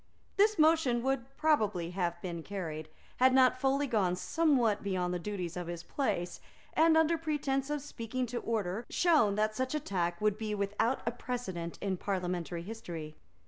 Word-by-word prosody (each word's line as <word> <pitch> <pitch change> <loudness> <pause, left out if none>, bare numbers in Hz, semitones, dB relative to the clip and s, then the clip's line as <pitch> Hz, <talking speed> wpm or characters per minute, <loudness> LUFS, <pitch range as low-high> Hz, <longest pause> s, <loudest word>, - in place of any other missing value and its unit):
This 425 +2 +4
motion 310 -7 +4
would 265 -2 0
probably 210 - +1
have 175 -2 -1
been 170 -3 -4
carried, 160 -5 -5 0.3
had 260 +1 +5
not 255 -1 +5
Foley 275 +1 +2
gone 205 -8 +1
somewhat 245 - +2
beyond 180 -3 -1
the 180 - -1
duties 180 -3 -4
of 175 -1 -4
his 170 -1 -5
place, 195 -10 -2 0.3
and, 320 0 +5
under 320 +1 +3
pretence 290 -3 -1
of 295 -2 -2
speaking 255 -2 -3
to 240 0 -3
order, 220 -2 -2
shown 305 - +3
that 215 +1 +1
such 260 +5 -1
a - - +1
tack 175 -8 -2
would 210 0 +1
be 215 -1 -2
without 205 +5 0
a 235 - +1
precedent 190 -9 -5
in 195 -2 -1
parliamentary 180 -3 -2
history. 170 -7 -7
215 Hz, 170 wpm, -32 LUFS, 180-270 Hz, 0.3 s, had